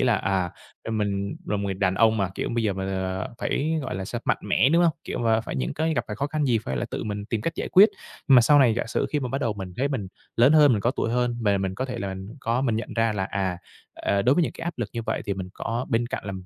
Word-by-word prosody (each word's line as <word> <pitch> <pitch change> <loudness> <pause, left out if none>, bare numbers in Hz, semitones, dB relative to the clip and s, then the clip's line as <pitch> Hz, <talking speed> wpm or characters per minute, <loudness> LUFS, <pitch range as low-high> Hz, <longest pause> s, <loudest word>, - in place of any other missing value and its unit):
là, 120 -4 +3
à, 95 -2 0 0.3
do - - -4
mình 100 -2 -1
là 105 - 0
một 100 - -3
người 95 -1 -1
đàn 95 -1 +1
ông 110 +2 +4
mà, 100 -3 0
kiểu, - - -2
bây 115 - +1
giờ 105 - +2
mình, 95 0 -4
ờ, 95 -1 -2
phải, 155 +3 -1
gọi 130 - -4
là 95 0 -3
sao, 115 +5 -4
mạnh - - +1
mẽ, 105 +4 +3
đúng 170 +4 +4
hông? 170 -2 +4
Kiểu - - -4
mà 115 -2 +2
phải 110 - -6
những 65 -2 -2
cái 160 +1 0
gặp - - 0
phải 105 - -5
khó 140 - -1
khăn 150 0 -1
gì 120 -5 +3
phải 65 -9 -4
là - - -1
tự - - -4
mình 105 -1 -4
tìm 110 0 -2
cách 165 +9 -2
giải - - -3
quyết. 200 +4 +8 0.4
Nhưng 135 - +7
mà - - +9
sau 145 +5 +5
này 120 -5 +5
giả 120 - -2
sử - - -1
khi 150 - 0
mà 125 - -2
bắt 135 +3 -2
đầu 115 - 0
mình 95 -3 -7
thấy 140 +2 +1
mình 115 -9 -3 0.3
lớn 125 +5 +6
hơn, 150 -4 +7
mình 105 - +1
có 120 - +2
tuổi 115 -3 -2
hơn 120 0 0
và 100 -2 +2
mình 95 -1 -2
có 130 - -2
thể 125 -2 -5
là 100 -2 -3 0.3
có 120 +2 0
mình 115 -5 +1
nhận 115 - -5
ra 115 -1 +2
là, 95 -2 -1
à, 95 -2 -2 0.4
à, 100 0 0
đối 130 +4 +4
với 175 - +3
những - - -3
cái - - -8
áp 170 -3 -4
lực 115 -3 -2
như 115 - -3
vậy - - -2
thì 100 - -1
mình 95 -1 -5
có 115 +2 -3
bên 115 +1 +1
cạnh 120 - -5
là 100 - -3
115 Hz, 315 wpm, -25 LUFS, 100-130 Hz, 0.4 s, mà